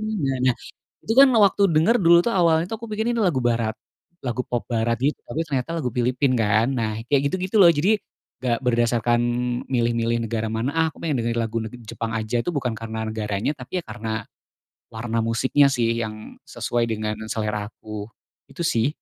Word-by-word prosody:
na, 140 -9 0
nah 125 - +3 0.5
itu 220 - 0
kan 270 0 +8
waktu 205 -3 +4
denger, 160 +9 +4
dulu 170 +1 +7
tuh, 195 +5 0
awalnya 170 -2 +3
tuh, 225 - -4
aku 230 - -5
pikir 220 +2 -1
ini 240 - +1
lagu 180 - +2
barat, 115 -2 +1 0.5
lagu 125 0 -3
pop 120 - -2
barat 115 0 0
gitu, 145 +3 +1
tapi 155 - -5
ternyata 135 0 -2
lagu 125 - -2
Filipina 125 +2 +1
kan, 110 0 +2
nah 110 -2 -2
kayak 140 +1 +2
gitu-gitu 185 +3 -3
loh, 170 - +8
jadi 170 +8 +2 0.5
gak 120 -2 +1
berdasarkan 120 -1 +2 0.5
milih-milih 115 -1 +1
negara 110 -1 -2
mana, 120 +7 -2
ah 165 0 +3
aku - - -18
pengen 155 -4 -1
dengerin 115 0 -1
lagu 115 0 -2
neg 110 +2 -7
Jepang 115 +1 -4
aja 110 +2 -1
tuh 175 - -2
bukan 125 -7 -2
karena 110 -1 -5
negaranya, 110 +4 -2
tapi 135 +7 -4
ya - - -9
karena 110 -2 -4 0.7
warna 115 0 -2
musiknya 130 +5 +3
sih 120 -4 +1
yang 110 -1 -6
sesuai 120 -1 -1
dengan 110 -1 -3
selera 105 -1 -2
aku, 105 -1 -8 0.4
itu 140 +5 -5
sih. 120 -6 +2
120 Hz, 185 wpm, -23 LUFS, 110-150 Hz, 0.7 s, kan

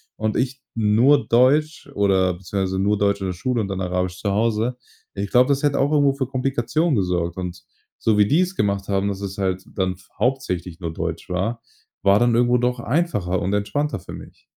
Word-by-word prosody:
und 110 0 -1
ich 130 +1 -2
nur 115 +4 +3
Deutsch 145 +6 +2
oder 95 -3 +2
beziehungsweise 95 +1 -3
nur 105 +1 +2
Deutsch 100 0 +1
in 95 - -3
der 90 - -2
Schule 120 +7 -2
und 100 - -2
dann 95 -1 -4
Arabisch 90 0 -2
zu 100 - 0
Hause. 115 +3 0 0.4
Ich 100 -1 -4
glaube, 125 +2 +4
das 140 +1 +1
hätte 145 -1 +2
auch 140 +2 +2
irgendwo 145 -2 +3
für 135 -1 -2
Komplikationen 135 +4 0
gesorgt. 90 -3 -1
Und 90 -2 -6 0.3
so 110 -2 +1
wie 105 - +5
die's 180 - +2
gemacht 100 -1 -1
haben, 100 0 0
dass 100 -1 -4
es 100 0 -6
halt 95 -1 -1
dann 95 -1 0 0.2
hauptsächlich 95 -8 -2
nur 85 -2 -4
Deutsch 85 0 -4
war, 100 +6 -2 0.4
war 100 +1 +5
dann 120 -1 +3
irgendwo 120 +1 +3
doch 125 0 0
einfacher 120 - 0
und 95 - -1
entspannter 140 +5 -1
für - - -10
mich. - - -12
105 Hz, 200 wpm, -22 LUFS, 95-125 Hz, 0.4 s, wie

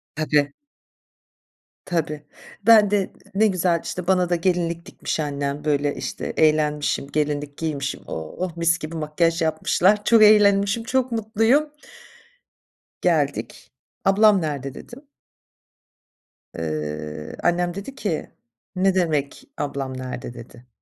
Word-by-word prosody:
Tabii. 150 -2 +1 1.3
Tabii. 155 -4 -2 0.4
Ben 215 -3 +7
de 200 -2 +1 0.2
ne 220 +2 +4
güzel, 180 -3 +1
işte, 180 -1 -5
bana 180 -2 +2
da 175 - +3
gelinlik 170 -1 -1
dikmiş - - -4
annem, 145 0 -3
böyle, 145 -1 +1
işte, - - -5
eğlenmişim, 150 -2 +2
gelinlik 145 -1 -1
giymişim. 145 -4 -3
Oh, 165 - -5
mis 170 0 +2
gibi 160 +2 -6
makyaj 165 +2 0
yapmışlar, 180 +6 +2
çok 230 -2 +5
eğlenmişim, 205 +1 +5
çok 255 0 0
mutluyum. 225 +7 +2 1.3
Geldik. - - -1 0.3
"Ablam 200 0 +5
nerede?" 140 -3 -4
dedim. 250 +4 -11 1.5
Iıı, 75 -1 -5
annem 175 0 +1
dedi 200 +8 -7
ki, 195 - -3 0.5
"Ne 190 +1 +2
demek, 155 -6 -1
ablam 135 -2 -4
nerede?" 125 -1 -6
dedi. 120 +1 -13
165 Hz, 110 wpm, -23 LUFS, 145-195 Hz, 1.5 s, Ben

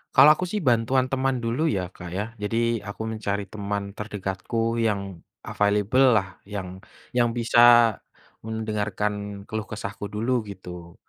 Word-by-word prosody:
Kalau 150 - +9
aku 180 - -3
sih 210 - 0
bantuan 125 +2 +3
teman 135 0 +1
dulu 115 +5 -1
ya 100 -10 0
Kak 85 - -8
ya, 100 - 0 0.2
jadi 110 +2 -1 0.3
aku 105 - -7
mencari 105 -2 -2
teman 100 -1 -3
terdekatku 105 +3 -2
yang 105 -3 +1 0.4
available 105 +5 +2
lah 95 -3 +2 0.2
yang 95 -3 -6 0.4
yang 120 -1 +4
bisa 115 0 +2 0.9
mendengarkan 105 -2 -3
keluh 110 0 -4
kesahku 100 -1 -6
dulu 105 +5 -2 0.2
gitu, 90 -3 -9
105 Hz, 135 wpm, -25 LUFS, 100-115 Hz, 0.9 s, Kalau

